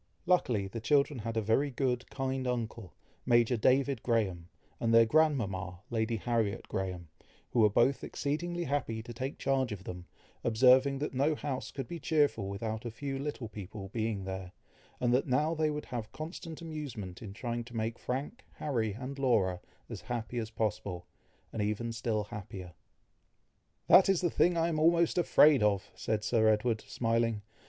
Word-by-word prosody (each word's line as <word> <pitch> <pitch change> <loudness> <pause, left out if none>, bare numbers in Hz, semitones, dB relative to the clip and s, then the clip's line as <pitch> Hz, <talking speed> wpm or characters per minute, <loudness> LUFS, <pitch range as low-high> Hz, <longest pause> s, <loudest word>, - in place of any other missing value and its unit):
Luckily 125 - +2
the 105 +4 -6
children 140 +2 +2
had 115 +1 -4
a 110 - +1
very 115 +7 +2
good, 125 -1 -1
kind 130 -1 -2
uncle, 115 -5 -3 0.3
Major 120 0 +4
David 130 +2 +2
Graham, 95 -8 0 0.3
and 115 - +1
their 115 0 +7
grandmama, 105 - +1
Lady 115 0 0
Harriet 115 -2 -1
Graham, 90 -3 -4 0.4
who 120 - +1
were 105 -1 +6
both 120 +6 +2
exceedingly 175 +4 -2
happy 130 -7 -2
to 120 - -8
take 130 +4 -4
charge 135 -3 0
of 100 -2 -6
them, 90 -1 -7 0.4
observing 130 +4 +5
that 145 +1 -3
no 140 +4 +2
house 135 -3 -4
could 135 -3 -6
be 170 - -6
cheerful 145 -12 +1
without 110 +2 -4
a 120 - -4
few 135 +4 -4
little 140 -4 -4
people 100 -1 -8
being 110 -2 -2
there, 95 -1 -6 0.5
and 120 -1 +2
that 130 +4 +2
now 150 +5 +2
they 155 -1 +1
would 150 0 -4
have 115 -3 -5
constant 165 +1 -7
amusement 140 - -6
in 105 - -7
trying 120 +3 -4
to 120 0 -12
make 115 +1 -2
Frank, 140 - -4
Harry, 115 -8 -1
and 130 +5 -6
Laura, 95 -9 +2 0.3
as - - -7
happy 120 0 -4
as 110 -1 -4
possible, 105 -5 -3 0.5
and 110 - -2
even 105 +3 -1
still 115 -2 -1
happier. 100 -4 -8 1.1
"That 190 - +7
is 195 -3 +3
the 175 - +1
thing 175 0 +3
I 165 0 +2
am 160 -2 -1
almost 170 +2 +4
afraid 150 -5 +6
of!" 100 -2 +1
said 110 -1 -2
Sir 110 0 +3
Edward, 110 +1 +2
smiling. 115 0 0
120 Hz, 170 wpm, -31 LUFS, 105-140 Hz, 1.1 s, their